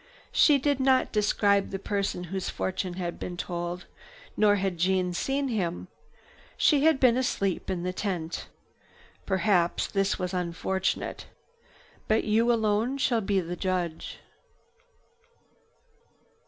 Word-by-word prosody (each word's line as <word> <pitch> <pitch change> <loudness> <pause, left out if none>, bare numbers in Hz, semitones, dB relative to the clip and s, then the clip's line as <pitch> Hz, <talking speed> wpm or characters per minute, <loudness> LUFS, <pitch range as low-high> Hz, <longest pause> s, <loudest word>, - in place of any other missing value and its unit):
She 295 -2 +5
did 280 0 0
not 265 -1 +3
describe 205 -1 +2
the 195 - -3
person 200 -2 -2
whose 190 -2 -2
fortune 185 -1 -3
had 175 -2 -4
been 175 -1 -5
told, 175 0 -4 0.5
nor 210 -1 +4
had 190 -3 -2
Jeanne 180 0 +1
seen 270 +8 -1
him. 170 - -2 0.7
She 295 -1 +4
had 320 -4 +4
been 250 -2 +4
asleep 200 -9 -1
in 180 -2 -2
the 180 0 -2
tent. 175 -5 -3 0.8
Perhaps 190 -3 +1
this 195 -1 0
was 180 -1 -3
unfortunate. 180 +1 -2 0.8
But 220 +1 +2
you 225 +3 +3
alone 225 +3 +1
shall 240 -4 +1
be 195 -1 +1
the 175 +1 -5
judge. 175 -3 -3
195 Hz, 125 wpm, -27 LUFS, 180-225 Hz, 0.8 s, She